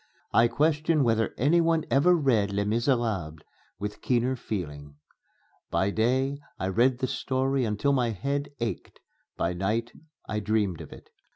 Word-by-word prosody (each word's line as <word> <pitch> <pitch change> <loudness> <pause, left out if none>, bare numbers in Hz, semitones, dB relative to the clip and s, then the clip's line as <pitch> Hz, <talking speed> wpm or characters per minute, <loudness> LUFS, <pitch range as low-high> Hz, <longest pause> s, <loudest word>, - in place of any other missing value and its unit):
I 115 - +6
question 155 +3 +2
whether 115 -2 +1
any 155 +8 +4
one 165 -1 +1
ever 175 +6 +5
read 120 -11 +2
"Les 100 +1 0
Misérables" 110 - 0 0.4
with 105 +2 -5
keener 125 +1 +1
feeling. 75 - -6 0.7
By 95 +1 +1
day 130 +6 +1 0.2
I 95 - -2
read 120 +6 +3
the 130 - -1
story 130 0 0
until 110 +6 +1
my 125 -3 +2
head 140 +7 -2
ached; 115 -1 -4 0.4
by 85 - 0
night 105 +6 -1 0.4
I 105 - -2
dreamed 105 -4 0
of - - -10
it. - - -14
115 Hz, 150 wpm, -27 LUFS, 105-135 Hz, 0.7 s, I